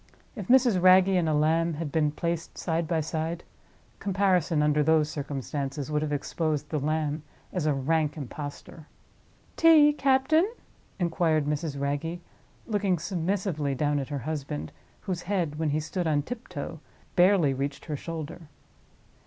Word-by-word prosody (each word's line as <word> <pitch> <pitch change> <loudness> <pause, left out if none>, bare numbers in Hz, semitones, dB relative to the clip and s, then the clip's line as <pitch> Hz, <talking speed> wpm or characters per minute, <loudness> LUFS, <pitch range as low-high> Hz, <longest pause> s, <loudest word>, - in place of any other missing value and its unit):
If 205 -6 -6
Mrs. 245 -7 +4
Wragge 185 +1 +7
and 180 -4 +2
a - - +1
lamb 160 +2 +2
had 155 -1 -4
been 155 -1 +2
placed 170 +2 -3
side 165 -1 -1
by 165 -1 +1
side, 160 +2 -3 0.6
comparison, 185 -5 +2
under 150 0 +3
those 155 0 +3
circumstances, 140 0 -4
would 150 0 +1
have 155 -1 -2
exposed 150 0 -2
the 155 - -1
lamb 155 +1 -1 0.3
as 175 -5 -1
a 150 - +3
rank 150 +2 0
impostor. 145 +2 -8 0.7
"Tea, 310 -3 +7
captain?" 280 +6 +3 0.5
inquired 165 -4 +1
Mrs. 150 -1 -2
Wragge, 145 +5 -2 0.5
looking 200 -4 +1
submissively 170 -4 -1
down 145 +1 +1
at 135 - -5
her 145 - -3
husband, 135 - -4 0.3
whose 180 -2 -3
head, 175 -6 -2
when 160 -2 +1
he 150 +2 +1
stood 170 +3 -3
on 145 -2 +1
tiptoe, 165 - -6 0.4
barely 180 -6 +4
reached 140 +1 -4
her 155 - -3
shoulder. 165 +1 -7
160 Hz, 145 wpm, -27 LUFS, 150-180 Hz, 0.7 s, Wragge